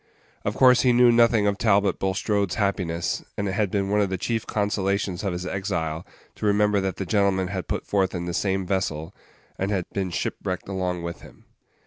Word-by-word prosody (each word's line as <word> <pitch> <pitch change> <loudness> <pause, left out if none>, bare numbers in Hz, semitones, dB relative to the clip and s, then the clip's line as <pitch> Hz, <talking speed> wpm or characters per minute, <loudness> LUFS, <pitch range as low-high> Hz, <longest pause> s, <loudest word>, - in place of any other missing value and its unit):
Of - - -2
course 125 -2 +6
he 125 -2 +4
knew 120 0 +6
nothing 115 -2 +4
of 100 0 0
Talbot 100 -3 +2
Bulstrode's 100 0 0
happiness, 90 -5 -1
and 100 - -1
it - - -1
had 100 +1 0
been 100 0 -1
one 105 0 +3
of 100 - +1
the 95 - -2
chief 115 +4 -2
consolations 100 -2 -1
of 100 - 0
his 90 +1 -4
exile 90 -4 -3 0.3
to - - -4
remember 105 0 +3
that 95 -1 -2
that 95 - -5
gentleman 95 -2 +2
had 95 -2 -4
put - - -3
forth 95 -2 0
in 85 0 -3
the 85 - -3
same 95 0 0
vessel, 90 -3 -2 0.5
and 95 - -1
had 95 -4 -1
been 95 -2 -1
shipwrecked 90 +1 -3
along 90 -3 -2
with 85 0 -6
him. - - -16
95 Hz, 200 wpm, -24 LUFS, 90-105 Hz, 0.5 s, course